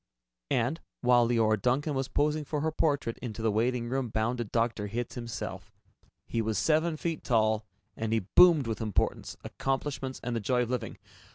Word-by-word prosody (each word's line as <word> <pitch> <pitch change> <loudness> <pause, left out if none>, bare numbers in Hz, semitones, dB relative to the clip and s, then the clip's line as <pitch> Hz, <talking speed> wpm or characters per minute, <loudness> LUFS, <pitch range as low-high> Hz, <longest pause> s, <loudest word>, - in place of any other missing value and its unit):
And, 125 +7 0 0.2
while 120 -1 +5
Leora 110 -3 +2
Duncan 140 +5 +1
was 135 -1 -1
posing 150 +1 +1
for 150 0 -3
her 160 +1 0
portrait, 145 -7 0
into 115 -3 -6
the 110 - +2
waitingroom 120 +2 0
bounded 115 +1 -1
Dr. 115 -3 0
Hitz 120 +4 -4
himself. 115 -2 -6 0.5
He 115 - -1
was 110 -1 -1
seven 160 +1 +2
feet 165 0 -3
tall, 110 -2 +2 0.3
and 110 0 -3
he 110 -4 +1
boomed 170 -6 +7
with 115 -1 -3
importance, 110 -3 -1
accomplishments, 135 -1 -3
and 120 0 -2
the - - 0
joy 125 +4 +1
of 120 - -4
living. 120 -3 -3
120 Hz, 170 wpm, -29 LUFS, 115-135 Hz, 0.5 s, boomed